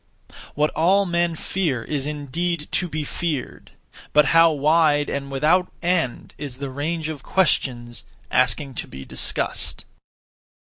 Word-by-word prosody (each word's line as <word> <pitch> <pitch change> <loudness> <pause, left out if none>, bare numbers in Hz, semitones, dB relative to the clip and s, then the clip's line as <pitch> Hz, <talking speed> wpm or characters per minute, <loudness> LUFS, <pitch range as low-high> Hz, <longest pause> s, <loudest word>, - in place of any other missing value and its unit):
What 150 +1 +2
all 190 +5 +3
men 170 -1 +1
fear 155 -9 -1
is 145 -2 -2
indeed 150 +3 -3
to 180 - +1
be 155 -1 -3
feared; 150 -2 -4 0.4
but 150 0 +6
how 165 0 +7
wide 150 0 +3
and 140 0 -3
without 155 +7 +2
end 170 -8 0
is 140 -4 -6
the 140 -1 -5
range 155 +4 -2
of 155 -3 -5
questions 120 -11 0 0.3
(asking 130 +2 +2
to - - -11
be 65 0 -9
discussed)! - - -2
150 Hz, 135 wpm, -23 LUFS, 140-170 Hz, 0.4 s, how